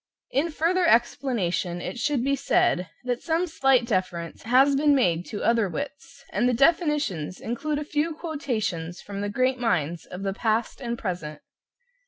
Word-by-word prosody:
In 295 +5 +1
further 340 +3 +1
explanation 230 - +1
it 240 - -5
should 275 0 0
be 275 +1 +2
said 180 -8 +1
that 245 0 -2
some 330 +2 +1
slight 270 -7 +3
deference 185 -6 -2
has 265 +4 +4
been 290 +1 +4
made 175 -10 +1
to 210 - -5
other 230 -4 +3
wits, 280 +3 -7
and 245 - +2
the 245 - +1
definitions 285 - +1
include 290 +6 -2
a 300 - -2
few 310 +2 -1
quotations 220 - -3
from 200 0 -6
the 205 - -2
great 255 +4 +1
minds 170 -8 -1
of 180 +2 -7
the 195 -1 -1
past 225 +4 -1
and 235 -2 -3
present. 160 -7 -5
240 Hz, 165 wpm, -25 LUFS, 185-285 Hz, -, has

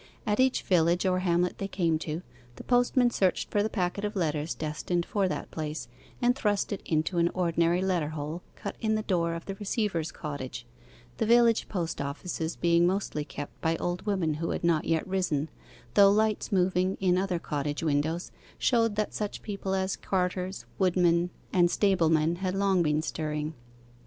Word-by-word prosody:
At 210 +2 0
each 260 0 +3
village 175 0 +3
or 185 -1 +2
hamlet 180 -1 +1
they 195 - -2
came 170 -5 0
to, 160 +2 -4 0.3
the - - -9
postman 245 0 +3
searched 190 -5 +1
for 205 - +2
the 215 - 0
packet 185 -1 -2
of 210 +1 -2
letters 155 -3 -1
destined 160 +3 -2
for 200 -2 0
that - - -4
place, 155 -4 -4 0.3
and 245 0 +3
thrust 210 -6 0
it 195 - -5
into 160 +2 0
an 170 0 +3
ordinary 170 0 +2
letter 175 -6 0
hole 155 +2 -5
cut - - -6
in 220 -1 +1
the 215 - -1
door 170 -4 0
of 165 - -7
the 195 - -4
receiver's 195 -4 -2
cottage 135 -6 -6 0.5
the - - +1
village 235 -1 +4
post 170 -7 -2
offices 160 +3 -3
being 170 0 +3
mostly 185 -5 -1
kept 145 0 -8
by 165 0 +1
old 175 +1 -3
women 185 -6 +1
who 165 +3 -3
had - - -3
not 170 -2 +2
yet 165 +2 0
risen, 180 -6 0 0.4
though 200 -1 +7
lights 215 +1 +1
moving 185 0 +2
in 185 -2 +3
other 185 -1 0
cottage 145 -2 -3
windows 160 +3 0 0.3
showed 230 -4 +2
that 215 0 -1
such 210 -1 -4
people 200 -2 -3
as 190 0 0
carters, 185 0 -2
woodmen, 175 -2 +3 0.2
and 175 -2 +5
stablemen 165 -4 +2
had 185 0 -2
long 195 -2 +2
been 155 -1 +1
stirring. 150 -1 -3
180 Hz, 175 wpm, -28 LUFS, 160-195 Hz, 0.5 s, though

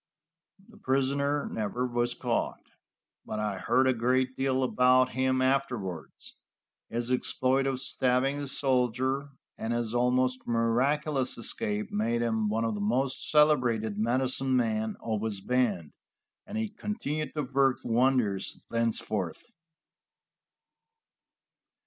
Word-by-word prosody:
The - - -16
prisoner 140 +2 0
never 110 +3 -2
was 120 -1 -1
caught, - - -2 0.6
but 110 - -5
I 105 -3 -2
heard 130 - +2
a 130 - +4
great 130 +2 +1
deal 130 -1 +1
about 125 0 +4
him 130 +1 +1
afterwards. 120 - -2 0.5
His 120 +1 -2
exploit 130 +1 +1
of 135 -1 -1
stabbing 130 +2 +1
the 145 - -4
soldier 130 +1 0 0.3
and 110 - -2
his 120 -1 -2
almost 125 +1 +1
miraculous 130 +4 +1
escape 105 -2 -3
made 115 +3 0
him 110 -2 0
one 110 +2 0
of 115 - -1
the 105 - -4
most 130 +6 0
celebrated 120 -9 +3
medicine 130 +3 0
men 110 -3 0
of 110 -2 -2
his 110 -3 -2
band, 105 -8 0 0.6
and 210 - -5
he 220 0 0
continued 155 -9 -4
to 150 - -1
work 135 0 +2
wonders 120 -5 +1
thenceforth. 115 - -2
125 Hz, 120 wpm, -29 LUFS, 115-135 Hz, 0.6 s, a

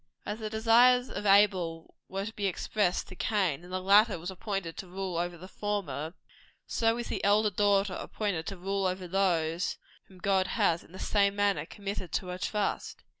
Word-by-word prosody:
As 210 +2 -4
the 215 -1 -4
desires 240 +3 +4
of 205 - -3
Abel 185 -5 +3 0.2
were 195 +1 -3
to 220 - -6
be 205 -2 -1
expressed 190 0 0
to 185 - -10
Cain, 185 -7 0
and 180 - -12
the 185 - -1
latter 200 +2 +5
was 175 +3 -5
appointed 190 -3 -4
to 190 - -6
rule 185 0 -4
over 175 +1 -2
the 180 +3 -10
former, 180 -7 -3 0.5
so 225 0 +1
is 240 - -5
the - - -3
elder 210 +1 +4
daughter 200 0 +2
appointed 190 -5 -3
to 195 - -5
rule 195 +1 -1
over 185 0 -3
those 175 -3 0 0.3
whom 190 - -17
God 190 0 +1
has, 170 -7 +1
in - - -19
the 185 - -10
same 200 0 +2
manner, 200 -7 +1
committed 200 -4 -6
to 180 - -1
her 180 0 -5
trust. 210 +1 -2
195 Hz, 190 wpm, -30 LUFS, 180-205 Hz, 0.5 s, latter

